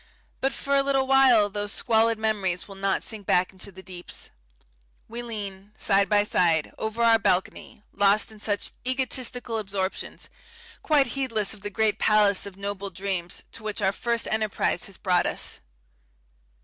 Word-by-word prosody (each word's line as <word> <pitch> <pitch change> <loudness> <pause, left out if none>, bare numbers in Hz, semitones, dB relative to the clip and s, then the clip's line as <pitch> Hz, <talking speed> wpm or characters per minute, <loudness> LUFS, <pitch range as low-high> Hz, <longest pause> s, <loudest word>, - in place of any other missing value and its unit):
But 270 - +1
for 280 - -3
a 275 - +5
little 275 -1 +1
while 260 -5 +5
those 205 0 -3
squalid 225 0 +2
memories 205 -5 -1
will 200 - -10
not 195 0 -1
sink 215 -4 -6
back 180 0 +3
into 190 +1 -5
the 190 0 -12
deeps. 180 -2 -8 0.8
We 235 +2 -6
lean, 205 -3 -6
side 195 0 +2
by 205 -1 +4
side, 170 -6 +1
over 220 +2 -2
our 230 -1 +6
balcony, 190 +2 -1
lost 205 +2 +3
in 215 - -14
such 205 -1 -1
egotistical 250 -2 0
absorptions, 195 -2 -4 0.5
quite 295 -3 +3
heedless 230 -7 0
of 210 - -13
the 205 - -4
great 215 +1 +1
palace 205 -2 +3
of 195 -1 -11
noble 200 0 -4
dreams 185 -1 -4
to - - -7
which 215 -1 -3
our 190 -2 +2
first 235 +3 -1
enterprise 215 -4 0
has 195 - -7
brought 180 -3 +2
us. - - -4
210 Hz, 160 wpm, -26 LUFS, 195-230 Hz, 0.8 s, our